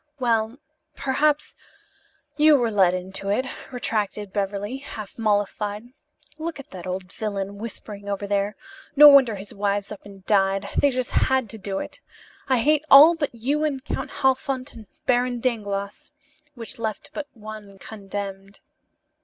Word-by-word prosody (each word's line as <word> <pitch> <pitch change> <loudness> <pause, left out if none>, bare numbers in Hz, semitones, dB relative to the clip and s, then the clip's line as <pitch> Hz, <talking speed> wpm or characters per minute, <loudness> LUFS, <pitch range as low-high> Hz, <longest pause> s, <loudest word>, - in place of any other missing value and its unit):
"Well, 230 -1 +1 0.4
perhaps 295 +2 0 0.8
you 305 0 +6
were 235 -3 0
led 190 -3 +4
into 190 +2 -5
it," 230 +6 +1 0.3
retracted 210 -5 -2
Beverly, 205 +4 -2
half 220 -7 -9
mollified. 210 +1 -1 0.5
"Look 325 -1 -4
at 275 - -11
that 185 -1 -8
old 185 0 -5
villain 200 -2 -4
whispering 205 -2 -7
over 200 0 -2
there. 200 0 0 0.4
No 295 +1 +10
wonder 270 -6 +7
his 200 +1 -9
wives 200 0 -1
up 210 - -8
and 195 -1 -14
died. 195 -1 +2
They 285 - +4
just 255 -1 -2
had 260 -5 +1
to 220 - -8
do 195 -1 -4
it. - - -6 0.5
I 260 - +3
hate 300 +3 +3
all 295 +5 +10
but 295 -7 -3
you 280 +7 0
and 280 -3 -2
Count - - -3
Halfont 265 0 0
and 220 -3 -12 0.2
Baron 245 -1 +1
Dangloss," 205 -5 -3 0.5
which 230 -1 -7
left 220 -3 -4
but 295 - -5
one 215 -2 -10
condemned. 195 -1 -7
215 Hz, 150 wpm, -24 LUFS, 200-260 Hz, 0.8 s, No